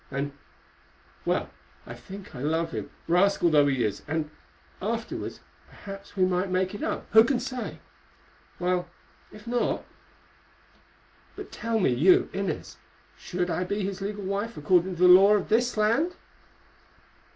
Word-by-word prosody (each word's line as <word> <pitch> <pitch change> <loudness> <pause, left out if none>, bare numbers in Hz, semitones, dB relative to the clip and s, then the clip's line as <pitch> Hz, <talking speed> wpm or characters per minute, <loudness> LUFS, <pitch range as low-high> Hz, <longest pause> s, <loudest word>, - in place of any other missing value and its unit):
And—well, 140 +1 -6 0.3
I 115 - -8
think 185 +12 -11
I 125 - -8
love 160 +3 0
him, - - -5 0.2
rascal 175 0 +3
though 145 -2 +5
he 130 -3 +1
is, 105 -2 -2
and, 155 0 -2 0.5
afterwards, 225 +3 -4 0.3
perhaps 195 0 -10
we 185 - +4
might 185 +1 0
make 185 +1 0
it 205 - -7
up, - - -2
who 220 +1 +8
can 255 +1 +1
say?—while, 180 -7 -6 0.4
if 210 0 -13
not—— 240 0 -1 1.5
But - - -9
tell 230 -1 -2
me, 155 -10 +3
you, 165 +10 +4
Inez, 195 -5 -4 0.4
should 180 0 -3
I 180 - 0
be 200 +3 -2
his 195 0 -4
legal 205 +1 -4
wife 200 +4 -3
according 180 +4 +2
to 175 - 0
the - - +8
law 195 +3 +8
of 200 - -1
this 240 +2 +2
land?" 235 +12 +2
185 Hz, 140 wpm, -27 LUFS, 165-210 Hz, 1.5 s, who